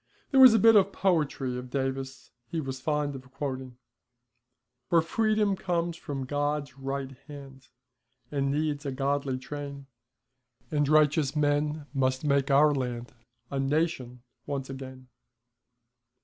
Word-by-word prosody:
There 270 - +4
was 255 -4 +10
a - - +6
bit 225 +1 +6
of 200 -1 +5
poetry 150 -10 0
of 125 0 -9
Davis 135 0 -4 0.2
he 160 - -3
was 135 -3 -5
fond 150 0 -1
of 130 -1 -10
quoting: 130 -3 -5 1.1
For 170 - +5
Freedom 210 +4 +1
comes 170 -2 -1
from 140 -5 -5
God's 145 -1 -2
right 135 0 -4 0.2
hand, 135 -4 -11 0.6
And 140 -1 0
needs 145 0 -1
a 140 - -3
godly 135 0 -1
train, 140 +1 -7 0.9
And 145 -2 +1
righteous 150 -1 +3
men 150 0 0
must 130 0 0
make 140 -1 +2
our 145 +2 +5
land 125 -3 -4 0.4
A 140 - -2
Nation 135 -4 -1 0.2
once 135 -2 -4
again. 130 -1 -9
140 Hz, 135 wpm, -28 LUFS, 135-155 Hz, 1.1 s, was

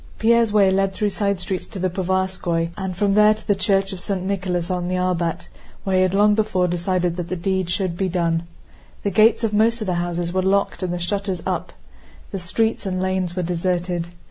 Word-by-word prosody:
Pierre's 230 0 +3
way 200 -2 +4
led 195 0 +1
through 205 +2 -1
side 200 -1 0
streets 185 +1 -4
to 215 - -9
the 185 -1 -1
Povarskóy 185 -2 -1
and 190 -2 -4
from 200 0 +2
there 210 +1 +6
to 215 - -14
the 205 - +4
church 195 0 +1
of 185 - -7
St. 190 -2 -2
Nicholas 185 -3 -1
on 180 -1 -1
the 185 - -1
Arbát, 180 -2 -1 0.4
where 190 -1 +1
he - - +4
had 185 0 +2
long 210 +1 +5
before 205 -4 +1
decided 175 0 -1
that 175 -1 -3
the 185 - -3
deed 190 0 -1
should 185 -1 -1
be 190 0 0
done. 170 -1 0 0.6
The 200 - 0
gates 220 +4 +4
of 220 -2 0
most 225 +3 +3
of 215 - -3
the 185 - 0
houses 175 0 -2
were 185 - +2
locked 195 +2 +1
and 185 -1 -2
the 175 - -2
shutters 190 0 -2
up. - - -2 0.6
The 195 - -3
streets 220 +4 -1
and 185 -1 -2
lanes 185 -2 -1
were 180 - -1
deserted. 175 0 -1
185 Hz, 220 wpm, -22 LUFS, 175-200 Hz, 0.6 s, there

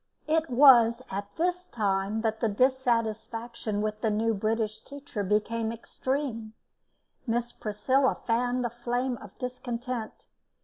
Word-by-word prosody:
It 320 0 +1
was 245 -2 +7
at 200 +1 -3
this 360 +2 -1
time 205 - 0
that 220 -1 -1
the 225 - +1
dissatisfaction 230 -2 0
with 215 0 -3
the 225 - +2
new 225 +2 +1
British 215 +1 -1
teacher 280 -7 -6
became 220 +3 0
extreme; 230 -1 -3 0.7
Miss 240 +1 0
Priscilla 260 +6 +1
fanned 245 +1 +1
the 235 - -2
flame 245 +1 -2
of 205 -3 -12
discontent. 250 -2 -5
230 Hz, 125 wpm, -28 LUFS, 215-255 Hz, 0.7 s, was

